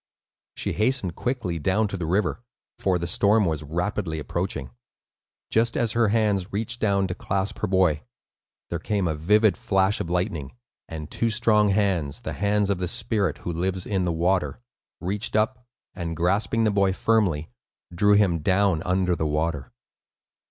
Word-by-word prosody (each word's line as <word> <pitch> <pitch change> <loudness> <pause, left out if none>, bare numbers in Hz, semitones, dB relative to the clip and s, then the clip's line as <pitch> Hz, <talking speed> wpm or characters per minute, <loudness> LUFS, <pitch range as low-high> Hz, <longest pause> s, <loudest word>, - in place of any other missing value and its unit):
She - - -1
hastened 110 -5 0
quickly 115 -10 -2
down 95 +7 +1
to 100 - -4
the 85 -4 -3
river, 95 +5 0 0.4
for 95 -2 +1
the 85 - -3
storm 100 +5 +3
was 80 -3 -1
rapidly 85 +2 -2
approaching. 75 -4 -3 0.8
Just 115 +1 +2
as 115 -3 +1
her 115 0 +2
hands 105 -3 +1
reached 115 +4 -3
down 100 -2 +2
to 90 - -3
clasp 95 +1 -2
her - - -1
boy, 90 -5 +2 0.7
there 85 - -2
came 100 0 -1
a 80 - 0
vivid 105 +7 +3
flash 95 +1 +1
of 85 - -3
lightning, 90 - -2 0.3
and 80 -2 -7
two 115 - 0
strong 105 -2 +3
hands 95 -8 0
(the - - -5
hands 100 0 +1
of 95 - -1
the 90 - -1
spirit 110 -4 -1
who 85 - -2
lives 90 +2 -2
in 95 -3 0
the 90 -1 0
water) 85 -2 0 0.4
reached 100 +6 -2
up, 120 +3 0 0.3
and 85 -3 -5
grasping 100 +6 +1
the 110 - +3
boy 100 -1 +2
firmly, 95 -7 +1 0.4
drew 105 +4 +4
him 100 -5 +3
down 95 0 +2
under 90 0 +1
the 80 -1 -1
water. 75 -2 -2
95 Hz, 165 wpm, -25 LUFS, 85-105 Hz, 0.8 s, drew